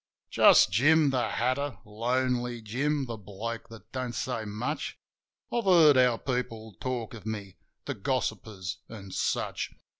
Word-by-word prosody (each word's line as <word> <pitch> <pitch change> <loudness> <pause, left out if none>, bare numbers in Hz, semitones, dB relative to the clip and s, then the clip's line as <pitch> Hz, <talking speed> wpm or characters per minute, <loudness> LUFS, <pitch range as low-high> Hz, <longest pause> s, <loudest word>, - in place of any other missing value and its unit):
Just - - +7
Jim 145 +7 +5
the 125 -2 0
Hatter, 130 +4 -1
Lonely 120 +2 -1
Jim, 135 +6 -1
the 115 -2 -5
bloke 110 +4 -6
that 115 -3 -13
don't 130 -2 -3
say 115 -4 -2
much. 110 +9 -3 0.6
I've 235 -3 0
heard 165 -6 +7
how 125 -2 +4
people 115 -4 -3
talk 125 -3 -3
of 110 -4 -9
me: 100 -4 -5 0.3
the - - -2
gossippers 95 -6 -3
an' 100 -4 -9
such. - - -1
120 Hz, 140 wpm, -29 LUFS, 110-130 Hz, 0.6 s, Just